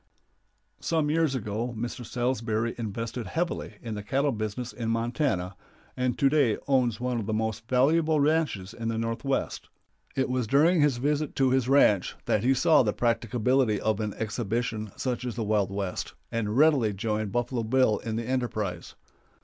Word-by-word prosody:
Some 155 -3 0
years 160 -3 +2
ago 115 +1 -3
Mr. 120 +3 -4
Salsbury 115 -2 -1
invested 115 +1 -4
heavily 170 +1 -3
in 115 -2 -4
the 105 - -4
cattle 135 +7 0
business 110 +2 -4
in 115 -2 -3
Montana, 115 - -1 0.4
and 125 -1 -1
to 140 - +4
day 135 -6 +3
owns 125 -5 +2
one 125 -1 -1
of 105 - -5
the 110 - 0
most 110 0 -2
valuable 155 +5 +3
ranches 145 - +1
in 115 -1 -5
the 115 0 -1
Northwest. 115 +4 -2 0.5
It 130 - +1
was 125 -3 -1
during 155 +7 +4
his 145 -4 +3
visit 145 +3 -1
to 135 -1 +3
his 130 -1 +1
ranch 105 -9 +4
that 105 - +1
he 130 +2 +3
saw 160 +4 +5
the 105 -4 +1
practicability 120 0 +1
of 110 -1 0
an 105 -2 -3
exhibition 110 -1 -2
such 125 -2 -2
as 125 -2 -4
the 115 - -2
Wild 105 -2 +1
West, 100 -2 -4 0.2
and 110 0 -1
readily 140 -8 +4
joined 105 0 -2
Buffalo 120 +1 -1
Bill 115 -1 +2
in 115 -2 -4
the 115 0 -3
enterprise. 110 -8 -3
120 Hz, 170 wpm, -27 LUFS, 110-130 Hz, 0.5 s, saw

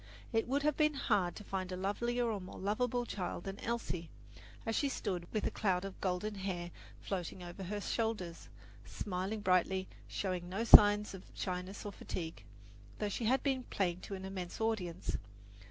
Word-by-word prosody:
It 225 0 +2
would 280 +3 +1
have 300 -1 +3
been 305 -1 +3
hard 185 -9 +2
to 210 - -8
find 190 -2 -3
a 185 - -2
lovelier 235 +6 0
or 215 -4 -1
more 185 - -8
lovable 240 +5 0
child 180 -5 -3
than 195 0 -5
Elsie, 205 -8 -2 0.6
as 225 - 0
she 285 - +2
stood 180 -9 -3
with 215 - 0
a - - +1
cloud 190 -3 +1
of 195 - -7
golden 190 +3 0
hair 185 -3 -3 0.3
floating 180 -1 -4
over 175 +2 -7
her 205 +3 -2
shoulders, 205 -6 -2 0.3
smiling 195 +2 -3
brightly, 185 0 +3 0.2
showing 180 -3 -2
no 195 +5 -1
signs 210 -2 +9
of 190 - -7
shyness 185 +2 -3
or 205 - -3
fatigue, 165 -4 -5 0.5
though 210 - -1
she 225 +3 -2
had 260 +4 +3
been 265 -3 +1
playing 180 -3 0
to 195 - -5
an 190 0 -6
immense 185 -2 -5
audience. 215 -7 -1
195 Hz, 175 wpm, -35 LUFS, 180-225 Hz, 0.6 s, signs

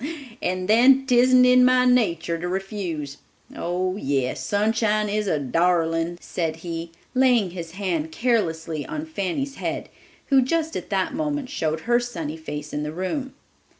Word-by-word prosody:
And 185 0 -2
then 255 +5 +5
'tisn't 250 0 +5
in 250 0 +6
my 255 0 +5
natur 170 -10 +2
to 175 - -3
refuse. 180 -7 -4 0.4
Oh, 185 +2 -2
yes; 135 -7 -1
Sunshine 215 0 +1
is 210 0 -1
a 160 - +1
darling," 165 +3 +1
said 165 -4 -3
he, 165 0 -4 0.2
laying 250 -7 +3
his 170 -2 -7
hand 175 -5 -2
caressingly 165 - -1
on 305 0 -4
Fanny's 275 - -3
head, - - -4 0.4
who 270 -2 +5
just 320 +4 -1
at - - -5
that 190 -3 0
moment 290 -4 -2
showed 160 - -1
her 240 +4 +2
sunny 170 -11 -5
face 150 -2 -7
in 150 - -2
the 150 0 -3
room. 255 - -4
190 Hz, 150 wpm, -24 LUFS, 165-250 Hz, 0.4 s, in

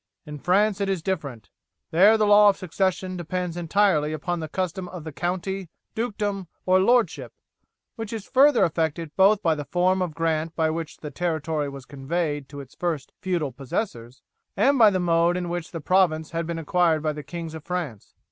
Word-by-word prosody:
In 150 -1 -8
France 200 +5 +2
it 200 - 0
is 190 -4 -1
different. 145 - -4 0.4
There 200 +7 +6
the 215 - +2
law 205 0 +7
of 195 - 0
succession 185 0 -1
depends 175 0 -3
entirely 175 -3 +2
upon 175 +3 -3
the 160 - -4
custom 185 +1 -3
of 180 -4 -8
the 160 - -6
county, 185 +3 -3 0.2
dukedom, 205 -4 -2 0.2
or 185 0 +4
lordship, 235 +4 +2 0.7
which 225 -2 -5
is 220 -3 -5
further 275 -1 +5
affected 160 -1 -1
both 195 +2 +4
by 165 - +3
the 150 -1 -4
form 185 +3 +1
of 170 -4 -2
grant 165 0 -1
by 160 -1 +1
which 160 -1 -5
the 150 - -8
territory 160 -4 -2
was 140 -2 -10
conveyed 145 +1 -3
to 145 -1 -8
its 135 - -14
first 160 -6 -3
feudal 175 -7 -1
possessors 125 - -5 0.3
and 270 +7 +3
by 220 -2 +8
the 190 -2 0
mode 170 0 +2
in 175 -1 -3
which 175 -1 -4
the 165 - -6
province 160 -2 +2
had 165 0 -3
been 170 -1 -3
acquired 165 -1 +1
by 155 -1 0
the 150 - -6
kings 165 +3 -7
of 160 -2 -8
France. 165 - -5
175 Hz, 190 wpm, -24 LUFS, 155-190 Hz, 0.7 s, by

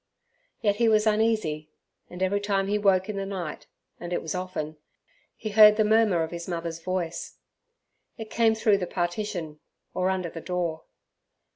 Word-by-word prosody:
Yet 205 -1 +2
he 230 0 +3
was 215 0 +3
uneasy, 215 -9 +1 0.4
and 180 +1 -4
every 200 +2 +1
time 200 -1 0
he 205 +1 0
woke 190 -2 +3
in 210 -2 -4
the 195 - -2
night 180 -6 -5 0.3
(and 175 0 -7
it 175 - 0
was 160 - -3
often) 180 -4 -4 0.6
he 215 - -5
heard 210 0 +8
the 215 - +4
murmur 215 -6 +3
of 160 - -5
his 170 0 -6
mother's 165 -2 -4
voice. 175 -2 -4 0.8
It 220 -1 -8
came 225 -1 +3
through 215 -2 +3
the 180 - -3
partition, 175 -3 -3 0.3
or 185 +1 0
under 185 -3 -2
the 165 - -7
door. 170 -3 -3
185 Hz, 170 wpm, -26 LUFS, 170-210 Hz, 0.8 s, heard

